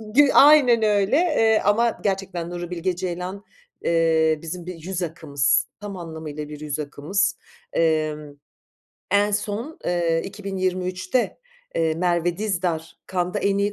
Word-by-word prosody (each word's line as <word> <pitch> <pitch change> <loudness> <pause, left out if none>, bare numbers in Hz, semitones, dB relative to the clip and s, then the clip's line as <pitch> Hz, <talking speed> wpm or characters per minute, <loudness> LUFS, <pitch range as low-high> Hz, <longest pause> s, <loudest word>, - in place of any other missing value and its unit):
gü 290 0 +7
aynen 275 -6 +7
öyle, 205 +3 +3
eee, 260 -11 +3
ama 230 +3 +2
gerçekten 190 -4 -2
Nuri 175 -1 -5
Bilge 180 +1 -1
Ceylan, 185 +2 -5 0.4
eee, 160 -2 +3
bizim 170 +1 -6
bir 180 0 -6
yüz 180 +3 -4
akımız, 150 -5 +1
tam 205 -1 -7
anlamıyla 160 -3 -7
bir 150 -1 -8
yüz 150 0 -3
akımız. 155 +7 -1 0.4
Emm, 155 -2 0 0.7
en 205 +1 +3
son, 210 +8 -3
eee, 170 -2 +1
2023'te, 185 +2 -2 0.4
eee, 160 -1 +1
Merve 175 0 0
Dizdar 175 -6 -2 0.2
Cannes'da 180 -1 0
en 200 0 +1
iyi 205 +1 +1
180 Hz, 130 wpm, -23 LUFS, 165-200 Hz, 0.7 s, gü